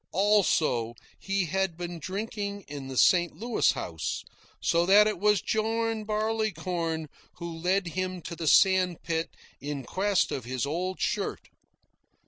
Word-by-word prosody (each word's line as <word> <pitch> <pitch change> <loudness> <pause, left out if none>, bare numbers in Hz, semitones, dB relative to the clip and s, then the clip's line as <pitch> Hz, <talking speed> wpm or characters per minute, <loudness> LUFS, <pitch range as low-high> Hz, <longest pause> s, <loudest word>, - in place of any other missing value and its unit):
Also, 170 - +2 0.2
he 195 -1 0
had 190 0 -1
been 175 -1 -5
drinking 200 +3 -4
in 140 -2 -7
the 130 -1 -6
St. 175 +3 +4
Louis 230 +7 +1
House, - - -4 0.4
so 170 0 +2
that 205 +2 +7
it 210 -4 -1
was 210 -2 +3
John 225 0 -1
Barleycorn 185 -7 -1 0.3
who 170 -1 -6
led 180 +2 0
him 185 +1 -3
to 170 - -6
the 165 -1 -4
sandspit 180 -3 +3 0.3
in 140 0 -4
quest 195 +8 +1
of 130 - -3
his 130 +2 -2
old 180 +6 -3
shirt. - - -2
185 Hz, 135 wpm, -28 LUFS, 165-205 Hz, 0.4 s, that